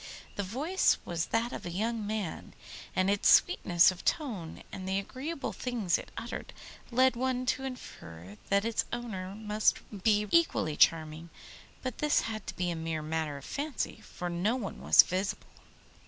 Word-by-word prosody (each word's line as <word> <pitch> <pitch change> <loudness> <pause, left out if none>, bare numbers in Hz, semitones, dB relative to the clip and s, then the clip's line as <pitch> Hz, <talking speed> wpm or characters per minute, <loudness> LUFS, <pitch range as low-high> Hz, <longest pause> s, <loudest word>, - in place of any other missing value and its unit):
The - - -1
voice 280 - +2
was 170 -2 -2
that 230 +2 0
of - - -6
a - - -4
young 215 +4 -2
man, 210 -5 -4 0.4
and 185 0 +2
its 200 0 +3
sweetness 175 0 +5
of 185 - -10
tone 210 - -2
and 190 -1 -6
the 190 - +1
agreeable 275 +10 -4
things 230 -9 0
it - - -10
uttered, 230 +1 -6 0.4
led 255 +1 +4
one 255 +1 -1
to 265 +1 0
infer 95 - -9
that 200 +1 +3
its 230 -1 0
owner 200 -6 -4
must 215 0 +1 0.3
be 210 -1 +4
equally 320 - +3
charming; 160 +1 +2 0.5
but 255 -3 -4
this 300 0 +3
had 215 -3 -5
to - - -5
be 180 -1 -1
a - - -2
mere 160 -1 -3
matter 155 -2 -2
of 140 - -11
fancy, 285 -2 -3
for 180 - -6
no 175 +7 0
one 225 -7 -5
was - - +8
visible. 190 +2 -2
205 Hz, 170 wpm, -30 LUFS, 175-245 Hz, 0.5 s, was